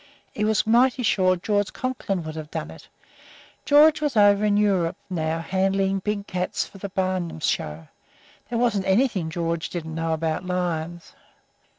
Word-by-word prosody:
He 210 - -3
was 215 0 +2
mighty 250 +3 +3
sure 185 -4 +3
George 205 +2 -1
Conklin 215 -8 -3
would 155 0 -7
have 155 -1 -7
done - - -5
it. - - -14 0.8
George 305 +1 +6
was 290 -6 -1
over 205 0 +5
in 205 -1 +3
Europe 195 -5 +1
now 160 -2 -1
handling 195 +2 0
big 205 +1 -3
cats 180 -2 -2
for 195 - -14
the 200 - -5
Barnum 185 - -2
show. 75 0 -2 0.6
There 235 - -2
wasn't 225 -5 +1
anything 190 -5 +2
George 165 0 -2
didn't 160 -2 -5
know 165 0 -1
about 160 +1 -2
lions. 175 -2 -3
190 Hz, 160 wpm, -24 LUFS, 165-210 Hz, 0.8 s, George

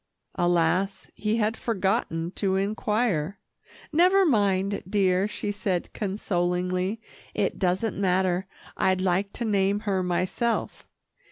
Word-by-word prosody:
Alas! 175 +2 +1
he 215 +1 -1
had 220 0 +1
forgotten 190 -7 -1
to 190 -1 0
inquire. 200 -3 0 0.6
"Never 370 +4 +5
mind, 200 - +2
dear," 190 -1 +2
she 210 -1 -3
said 190 -3 -2
consolingly. 180 0 -1 0.4
"It - - 0
doesn't 190 +2 0
matter. 185 0 +1 0.3
I'd 185 0 +2
like 190 +2 +1
to 235 - -3
name 200 -1 +1
her 195 -3 0
myself. 185 +6 -1
195 Hz, 110 wpm, -26 LUFS, 180-210 Hz, 0.6 s, Never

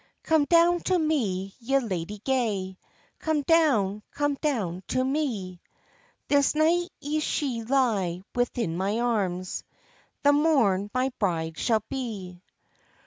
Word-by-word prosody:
"Come 315 -2 +3
down 340 +2 +4
to 370 - +3
me, 210 - -1
ye 265 +3 +1
ladye 205 -5 -3
gay, 205 -8 -1 0.4
Come 310 -2 0
down, 255 - +3
come 290 0 0
down 225 - -2
to 255 - 0
me; 230 - -2 0.7
This 285 0 +3
night 340 +3 +2
ye 300 +2 -2
shall 260 -6 -2
lye 210 -10 +1
within 240 -7 -1
my 195 +5 -1
arms, 190 -7 -1 0.6
The 285 0 +6
morn 245 -11 +3
my 255 +1 0
bride 165 -5 -1
shall 220 -3 +1
be." 200 -9 -5
245 Hz, 125 wpm, -26 LUFS, 190-290 Hz, 0.7 s, The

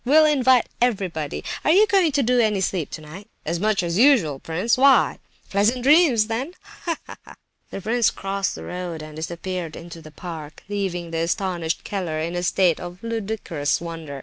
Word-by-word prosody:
We'll 310 +5 +5
invite 260 -5 +4 0.2
everybody! 185 - -1 0.2
Are - - +1
you 390 +7 +6
going 385 -6 +3
to 280 -1 +2
do 250 +1 +2
any 215 -4 +2
sleeping 185 -4 -1
tonight?" 160 +6 -9 0.2
"As 170 +2 -1
much 210 -1 +1
as 170 +2 -1
usual, 225 - +4
prince—why?" 235 - +3 0.3
"Pleasant 220 +5 +2
dreams 280 -6 +5
then—ha, 290 +7 -5
ha!" - - -13 0.3
The - - -6
prince 230 +2 +2
crossed 195 0 -3
the - - -8
road, 175 -3 -5
and 155 0 -10
disappeared 170 +1 -5
into 165 0 -10
the 155 - -12
park, 155 -2 -9
leaving 185 -4 -3
the 165 - -2
astonished 170 -1 -1
Keller 180 -6 -3
in 165 +2 -2
a 175 - -1
state 180 -2 +2
of 175 0 -7
ludicrous 210 -10 -2
wonder. 165 -4 -7
190 Hz, 170 wpm, -23 LUFS, 165-240 Hz, 0.3 s, you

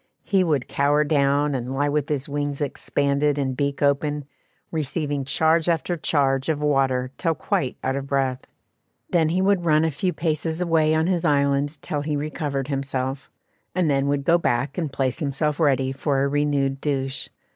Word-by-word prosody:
He 195 -2 +2
would 150 -7 0
cower 145 +2 +2
down, 145 -1 +2
and 130 0 -3
lie 145 +2 +1
with 145 0 -1
his 140 -3 -1
wings 145 -1 -2
expanded 145 0 0
and 135 -2 -1
beak 140 +1 -1
open, 145 +1 +1 0.5
receiving 145 -2 -2
charge 160 +4 +2
after 170 +1 0
charge 135 -4 +1
of 155 -2 0
water 135 -3 +1
till 165 -3 +1
quite 130 -1 -1
out 130 0 0
of 140 0 -4
breath; 135 -2 -1 0.6
then 165 -3 +3
he 185 +3 +1
would 195 -2 +2
run 155 -1 +3
a 160 - +1
few 180 +6 -1
paces 160 0 -2
away 160 -3 +2
on 160 0 +2
his 180 -1 0
island 140 -1 +1
till 145 -2 -2
he 150 0 -2
recovered 145 -2 -3
himself, 135 -1 -3 0.5
and 175 -5 +2
then 135 0 +1
would 140 0 0
go 170 +3 +4
back 135 -2 0
and 160 -5 -2
place 135 +1 -1
himself 150 0 -1
ready 135 -4 +2
for 135 0 0
a - - +2
renewed 140 -1 0
douche. 135 -2 -2
145 Hz, 180 wpm, -23 LUFS, 135-155 Hz, 0.6 s, go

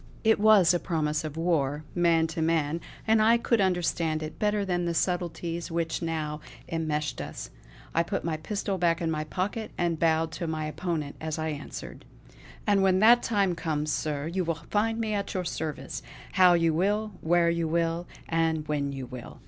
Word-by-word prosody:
It 220 -1 +4
was 205 -5 +6
a 175 - +1
promise 155 -3 -1
of 155 0 -6
war, 155 -4 0
man 170 -2 +3
to 165 0 -3
man, 160 0 +1 0.2
and 220 0 +4
I 230 +2 +5
could 235 -2 +1
understand 170 -4 0
it 155 - -7
better 210 -1 +1
than 175 -2 0
the 170 -1 -1
subtleties 170 -1 -1
which 165 -1 -2
now 155 -2 -3 0.3
enmeshed 155 -2 -2
us. - - -7 0.4
I 165 - +3
put 195 +4 -2
my 165 -2 -1
pistol 195 +2 -3
back 170 -1 +2
in 165 -2 -1
my 155 -1 -2
pocket, 200 +7 -3
and 170 -2 0
bowed 160 -1 +2
to 170 +1 -4
my 155 -1 -2
opponent 155 -2 -3
as 160 0 -3
I 160 0 -2
answered: 145 -2 -7 0.6
"And 200 -1 +3
when 190 -1 +4
that 235 +4 +7
time 200 -5 +1
comes, 155 -3 -2
Sir, 145 -2 -2
you 180 +3 -1
will 165 -1 -3
find 225 +2 +1
me 220 -2 -1
at 200 -1 -2
your 185 -1 -1
service; 150 -5 -4 0.3
how 185 -2 +6
you 165 -1 +2
will; 205 +6 +1
where 170 +1 +3
you 170 -1 0
will; 170 +1 0 0.2
and 160 -2 0
when 145 -2 -1
you 135 -2 -5
will. 125 -1 -9
165 Hz, 190 wpm, -28 LUFS, 155-185 Hz, 0.6 s, that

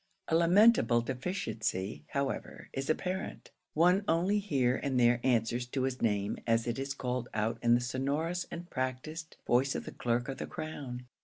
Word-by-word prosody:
A 160 - +3
lamentable 170 - +5
deficiency, 115 - -3
however, 140 -1 -3
is 135 0 -3
apparent; 185 +4 -2 0.2
one 180 +5 +4
only 185 +5 +2
here 135 -11 +1
and 130 -3 0
there 120 0 +4
answers 120 -1 +1
to 130 +1 -2
his 130 -1 -2
name 105 -2 0
as 115 0 +3
it 120 +1 -2
is 135 0 -3
called 125 -2 -3
out 110 +2 0
in 120 0 +5
the 120 - +1
sonorous 145 +8 -1
and 170 +1 -7
practised 130 +4 -4
voice 130 +3 +2
of - - -3
the - - -6
clerk 120 +2 -1
of 135 - -5
the - - -4
crown. 140 -6 -6
130 Hz, 170 wpm, -31 LUFS, 120-160 Hz, 0.2 s, lamentable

